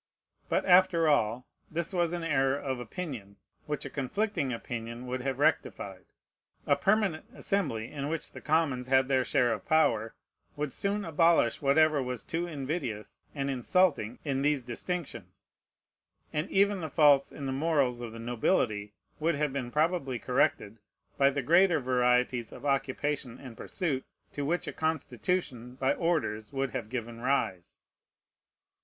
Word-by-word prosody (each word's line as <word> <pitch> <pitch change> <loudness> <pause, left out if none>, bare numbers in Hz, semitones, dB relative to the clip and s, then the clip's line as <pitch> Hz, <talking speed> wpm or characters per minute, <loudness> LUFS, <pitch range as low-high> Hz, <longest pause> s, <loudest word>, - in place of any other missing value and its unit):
But, - - +1
after 180 -3 +5
all, 125 -4 +2 0.2
this 170 +3 -3
was 175 -2 +1
an 175 -1 -3
error 135 -3 +2
of 130 -3 -3
opinion, 120 - -6 0.3
which 150 -1 -3
a - - -4
conflicting 145 - -1
opinion 115 0 -5
would 125 0 -3
have 135 0 -2
rectified. 95 -9 0 0.6
A 140 - +4
permanent 195 +2 +1
Assembly, 115 - -1
in 140 -1 -4
which 165 0 -3
the - - -10
commons 145 -5 +1
had 130 0 +4
their 130 -1 +2
share 125 -2 +2
of - - -5
power, 115 -8 +2 0.4
would 145 -2 -3
soon 200 0 -1
abolish 165 -6 +3
whatever 150 +1 +4
was 125 -4 -3
too 170 +2 -2
invidious 135 - -4
and 140 -1 -2
insulting 135 - +1
in 135 -2 0
these 145 -2 +1
distinctions; 165 +7 -6 0.9
and 150 +5 -1
even 200 0 +2
the 160 - -4
faults 145 -3 +5
in 140 - -7
the 135 - -1
morals 135 -4 +1
of 120 -2 -5
the 115 - -9
nobility 115 - 0 0.3
would 160 +1 +1
have 145 -1 -1
been 130 -3 -3
probably 150 -2 0
corrected, 115 -4 0 0.4
by 140 0 +6
the 140 -1 -2
greater 170 +3 +5
varieties 125 -2 +1
of - - -10
occupation 135 -2 -1
and 125 -4 -10
pursuit 145 - -2 0.3
to 145 - -3
which 170 +4 0
a - - -5
constitution 145 -4 -2
by 135 +1 +1
orders 145 -12 -1
would 135 -2 -2
have 105 - -4
given 120 -1 -5
rise. 110 -9 -1
140 Hz, 150 wpm, -29 LUFS, 125-160 Hz, 0.9 s, by